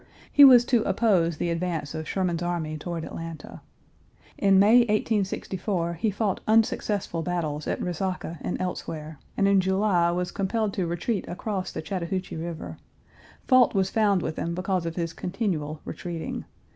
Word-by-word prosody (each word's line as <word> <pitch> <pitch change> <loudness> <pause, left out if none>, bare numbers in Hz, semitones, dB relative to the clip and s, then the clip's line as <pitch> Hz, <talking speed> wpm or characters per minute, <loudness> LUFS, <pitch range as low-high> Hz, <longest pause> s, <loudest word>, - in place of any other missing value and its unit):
He 290 - +8
was 250 -3 +9
to 240 -3 +3
oppose 180 -10 +2
the 170 - -1
advance 165 -4 -2
of 160 -1 -5
Sherman's 180 -3 -1
army 170 -3 -2
toward 165 +1 -5
Atlanta. 165 -2 -8 0.7
In 195 -1 +4
May, 210 +5 +7
1864, 200 -5 0
he 170 +6 0
fought 205 -1 -1
unsuccessful 215 -5 +1
battles 160 -4 -2
at - - -1
Resaca 180 -2 -3
and - - -3
elsewhere, 160 -4 -5 0.2
and 195 - +3
in 200 -1 +4
July 190 -2 +2
was 180 +1 -1
compelled 205 +1 -1
to 180 -3 -1
retreat 175 +5 -2
across 190 0 -4
the - - -5
Chattahoochee 185 +2 -3
River. 165 0 -6 0.7
Fault 255 -4 +5
was 190 -1 +1
found 205 -5 +2
with 155 - -3
him 170 0 -2
because 185 -1 -1
of 165 - -4
his 165 -2 -2
continual 175 -7 -3
retreating. 170 -3 -5
180 Hz, 155 wpm, -26 LUFS, 165-200 Hz, 0.7 s, was